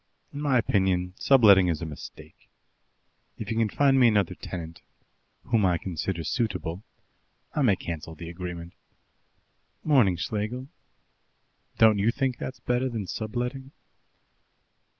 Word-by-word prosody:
In 145 - -5
my 140 -3 +2
opinion, 95 -5 +1
subletting 105 -9 +6
is 80 -3 0
a 85 - -4
mistake. 75 -2 -11 0.9
If - - -6
he 115 - -1
can 115 -1 +1
find 135 +3 +3
me 125 - +7
another 105 -5 +2
tenant, 85 -2 -8 0.6
whom 115 -3 +1
I 90 -2 +3
consider 85 0 -4
suitable, 90 -3 -2 0.7
I 150 - 0
may 115 -8 +4
cancel 80 -2 -6
the 85 +1 -9
agreement. 85 0 -7 1.1
Morning, 125 - +4
Schlegel. 110 +8 -3 1.1
Don't 110 -2 +5
you 105 +3 +3
think 130 0 -1
that's 130 - -6
better 125 +2 0
than 115 -5 -4
subletting?" 125 +7 -4
105 Hz, 130 wpm, -26 LUFS, 90-125 Hz, 1.1 s, me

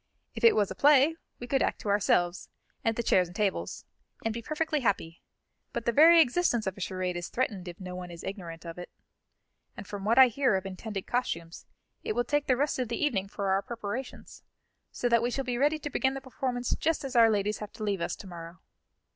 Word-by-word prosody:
"If 225 - -8
it 230 - +7
was 205 -2 +1
a - - -5
play, 290 +2 +5 0.2
we 245 - -7
could 265 +2 +1
act - - 0
to 210 - -4
ourselves, 180 -3 +1 0.3
and 225 -1 +1
the 235 - -2
chairs 185 -5 +3
and 175 - -14
tables, 205 -2 -2 0.4
and 225 - 0
be 235 - -5
perfectly 310 +4 -1
happy; 195 -8 -1 0.5
but 235 -1 -3
the 235 - +2
very 330 +7 +7
existence 260 -5 +2
of 190 -1 -2
a 200 - -10
charade 185 -1 -2
is 175 0 -4
threatened 205 -7 -2
if 175 0 -8
no 185 -1 -7
one 180 -1 -7
is 170 -1 -10
ignorant 175 -4 -7
of 165 +1 -7
it. 180 - -8 0.9
And 200 - -7
from 200 0 -7
what 225 +4 +2
I 260 -1 +10
hear 255 -2 +2
of 190 0 -2
intended 195 +1 -5
costumes, 170 -9 -3 0.4
it - - -2
will 240 +2 +1
take 290 +4 0
the 255 - +3
rest 285 0 0
of 250 - -1
the 235 - -3
evening 220 -11 0
for 195 -1 -2
our 195 +1 +2
preparations, 235 +3 -6 0.5
so 245 - -1
that 235 -1 +4
we 240 - 0
shall 270 +2 -3
be 245 -1 -2
ready 295 +3 +3
to 295 -1 -5
begin 265 +1 +1
the - - -4
performance 250 -2 -2
just 320 -3 0
as 265 -1 -6
our 230 -1 +7
ladies 210 0 0
have 210 -1 -7
to 225 - -7
leave 200 -4 -1
us - - -2
to - - -12
morrow." 170 -1 -9
225 Hz, 230 wpm, -29 LUFS, 190-260 Hz, 0.9 s, I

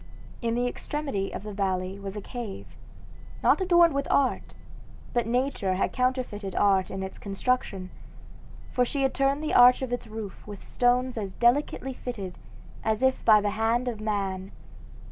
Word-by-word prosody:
In 230 -1 0
the 245 +1 +1
extremity 245 -6 -3
of - - -6
the 210 -1 -6
valley 190 -1 -2
was 195 0 -6
a 210 - -4
cave, 230 -3 -7 0.7
not - - +4
adorned 345 -3 +5
with 280 0 -1
art, 275 -2 +1 0.6
but 240 -2 +1
nature 245 -6 0
had 190 - 0
counterfeited 250 -6 -1
art 195 -2 +3
in 190 0 -4
its 190 - -7
construction, 195 -2 -2 0.8
for 250 - +2
she 275 +3 -1
had 265 - +1
turned 275 +2 +1
the 305 - -1
arch 250 +1 +7
of 250 -2 -3
its 245 - -3
roof 215 -3 -8
with 205 -2 -9
stones 250 0 +1
as 195 -3 -5
delicately 265 +2 +1
fitted 205 -8 -6 0.5
as 220 +2 0
if 260 0 +2
by 215 -2 +7
the 205 0 0
hand 225 +4 0
of 225 -3 -3
man. 195 -3 -2
230 Hz, 165 wpm, -27 LUFS, 200-255 Hz, 0.8 s, arch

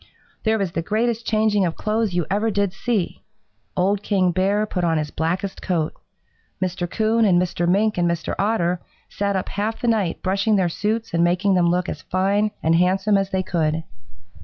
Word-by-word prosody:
"There 220 0 +3
was 195 -4 -1
the 165 - -2
greatest 225 +5 -1
changing 215 -2 +2
of 170 -3 -1
clothes 215 -3 -1
you 175 -3 +1
ever 210 +3 0
did 200 -2 0
see. 215 -3 -2 0.6
Old 195 +2 +2
King 190 -4 +2
Bear 195 +4 +1
put 185 -4 -3
on 165 -2 +2
his 150 -1 -2
blackest 180 +5 -2
coat. 165 -4 -1 0.7
Mr. 180 -1 -2
Coon 225 +3 +1
and 185 -5 +4
Mr. 175 -1 0
Mink 205 +1 +2
and 175 0 +2
Mr. 170 -1 -2
Otter 180 -4 +1 0.3
sat 200 0 -1
up 190 - -2
half 215 +2 -2
the 245 - -2
night 210 -7 0
brushing 195 +3 +2
their 185 -3 +2
suits 215 +5 -2
and 170 0 +3
making 180 +3 +2
them 175 -2 +3
look 180 +1 0
as - - -5
fine 200 +3 +1
and 160 - +3
handsome 190 +4 +3
as 195 -1 +1
they 190 -1 -1
could. 160 -3 0
190 Hz, 190 wpm, -22 LUFS, 175-210 Hz, 0.7 s, and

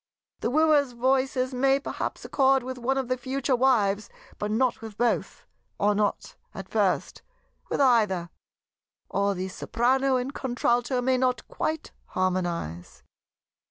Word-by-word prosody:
The - - -1
Wooer's 295 -2 +3
voices 260 +1 +1
may 270 +2 +3
perhaps - - -5
accord 270 -2 +3
with 255 0 -6
one 265 +3 0
of 265 -2 -1
the 255 0 -1
future 265 +1 0
wives, 215 -5 +2 0.3
but 210 - -2
not 245 +3 +1
with 220 -2 -9
both; 240 0 -1 0.3
or 205 +1 +2
not, 205 0 -1 0.2
at - - -7
first, - - 0 0.5
with - - -1
either; 210 -10 +3 0.8
or 200 0 0
the 185 +1 -3
Soprano 260 +7 +1
and 255 +2 -2
Contralto 245 -1 0
may 260 0 +2
not 250 -2 0
quite 315 0 -3
harmonize. 175 - -3
250 Hz, 135 wpm, -26 LUFS, 210-265 Hz, 0.8 s, Wooer's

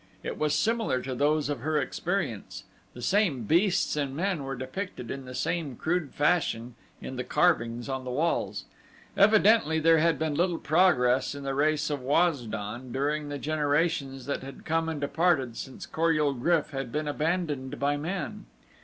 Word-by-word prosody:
It - - -5
was 150 -1 +1
similar 225 - +1
to 130 - -4
those 150 +3 +1
of 145 -3 -2
her 150 +4 0
experience 135 - -3 0.3
the 120 - -8
same 175 - +2
beasts 175 - +2
and 140 -2 -2
men 180 -2 -1
were 135 0 -4
depicted 130 - -5
in 135 -1 -6
the 125 0 -8
same 160 -4 -2
crude 160 +1 -2
fashion 145 -7 +1 0.3
in 130 - -6
the 125 - -2
carvings 120 -8 +1
on 130 -1 -3
the 130 - -6
walls 125 - -1 0.5
evidently 210 -5 +5
there 165 +1 +5
had 165 +1 +3
been 160 -1 -1
little 170 +2 +1
progress 145 -7 +3
in 140 - -7
the 135 0 -2
race 150 +1 +1
of 145 -2 -2
Waz 145 -1 +2
don 110 +5 -5
during 145 +3 -1
the 145 - -4
generations 145 -3 0
that 140 - -2
had 135 0 -10
come 165 0 0
and 160 -2 -3
departed 140 -4 +1
since 130 +2 -7
Kor 165 +1 +1
ul 150 -2 +2
GRYF 155 +5 +1
had 135 -4 -4
been 150 +2 -2
abandoned 150 -3 -2
by 145 +1 +1
men. 185 +7 -4
145 Hz, 175 wpm, -28 LUFS, 130-165 Hz, 0.5 s, evidently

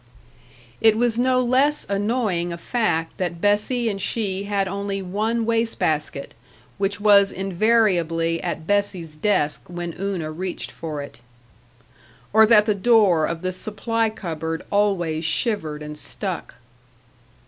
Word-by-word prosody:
It 220 -1 +5
was 235 0 +1
no 255 0 +3
less 270 +5 +2
annoying 200 -4 -1
a 170 - -5
fact 170 -5 -1
that 175 -3 -3
Bessie 210 +5 +1
and 200 -3 -2
she 200 -2 -2
had 200 -1 0
only 200 +1 -3
one 220 +5 -1
waste 230 0 0
basket, 150 -2 -2 0.5
which 200 +1 -1
was 200 -1 +5
invariably 180 -4 +1
at 160 - -4
Bessie's 190 -5 -1
desk 155 -4 0
when 175 -1 -5
Una 190 -5 -3
reached 180 +3 -5
for 150 -3 -5
it. 140 - -12 1.1
Or 220 0 +7
that 210 -2 +6
the 215 - +2
door 200 -6 +4
of 165 +1 -4
the 185 - -1
supply 225 +4 -1
cupboard 165 -6 -5
always 180 -6 +1
shivered 160 -6 -1
and 150 0 -7
stuck. 150 - -5
200 Hz, 135 wpm, -22 LUFS, 170-220 Hz, 1.1 s, Or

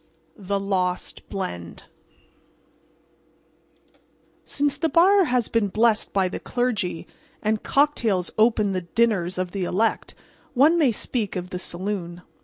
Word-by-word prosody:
THE 200 0 -2
LOST 185 -2 -2
BLEND 90 - -6 2.6
Since 285 0 0
the 325 - +1
bar 380 +4 +5
has 250 -5 +1
been 225 -3 +1
blessed 220 +2 +2
by 195 -2 +2
the 180 - -5
clergy, 220 -9 -2 0.4
and 215 0 0
cocktails 235 -11 +1
open 215 -2 +3
the 185 -1 -1
dinners 185 -1 0
of 185 -1 -2
the 195 -1 -3
elect, 210 +5 -1 0.4
one 305 +7 +5
may 280 -6 +4
speak 215 -1 -3
of 180 0 -5
the 180 - -4
saloon. 180 -1 -5
205 Hz, 125 wpm, -24 LUFS, 185-240 Hz, 2.6 s, bar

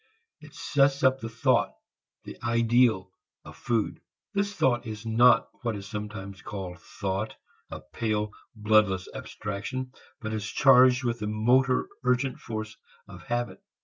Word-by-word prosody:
It - - -15
sets 140 -1 +2
up 130 0 +4
the 115 - -5
thought, 115 - +1 0.5
the - - -9
ideal, 115 -4 +2 0.3
of - - -11
food. 115 -3 -1 0.3
This 200 0 0
thought 125 - +1
is 110 +1 -7
not 115 +1 +5
what 120 -3 -2
is 100 -1 -7
sometimes 105 -2 -6
called 95 -4 -6
thought, 100 +2 -4 0.3
a - - -7
pale 105 +5 -2 0.2
bloodless 105 -3 +2
abstraction, 110 +5 -5 0.3
but 110 -4 -4
is 105 -1 -3
charged 130 -2 +6
with 120 -1 -1
the 105 - -3
motor 125 +5 +2 0.2
urgent 125 +1 +1
force 110 -1 -6 0.3
of - - -11
habit. 120 -5 -2
115 Hz, 140 wpm, -27 LUFS, 105-125 Hz, 0.5 s, charged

